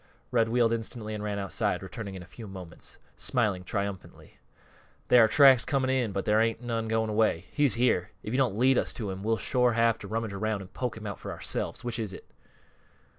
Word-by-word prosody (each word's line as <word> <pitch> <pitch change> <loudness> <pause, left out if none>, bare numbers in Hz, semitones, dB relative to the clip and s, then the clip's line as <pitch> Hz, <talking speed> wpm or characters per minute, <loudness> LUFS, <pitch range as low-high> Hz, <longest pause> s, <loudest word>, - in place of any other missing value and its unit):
Red 115 -2 +2
wheeled 115 -1 +3
instantly 110 -1 -3
and 105 -1 -4
ran 105 -1 -2
outside, 95 -4 -1
returning 100 -4 -7
in 90 - -7
a - - -13
few 110 +5 -10
moments, 95 -4 -9 0.2
smiling 105 -8 0
triumphantly. 100 0 -5 0.7
"There 125 -2 +8
are - - +6
tracks 130 0 +7
coming 130 -2 0
in, 125 -5 +1
but 100 0 -3
there 105 +1 +4
ain't 115 0 +1
none 115 -2 -2
going 110 0 0
away. 105 -5 +1
He's 145 -7 +2
here. 120 -7 +2
If 110 - -4
you - - +1
don't 125 -7 +1
lead 130 +2 +4
us - - 0
to 105 -5 -4
him 95 0 -6
we'll 110 +2 +1
shore 125 0 +2
have 115 0 +2
to 100 - -8
rummage 110 0 -3
around 105 +1 -2
an' 90 - -13
poke 125 +1 -4
him 110 - -9
out 100 -2 -5
for - - -6
ourselves: - - -4
which 120 -1 -3
is 105 -4 -3
it?" - - -11
110 Hz, 220 wpm, -28 LUFS, 100-120 Hz, 0.7 s, There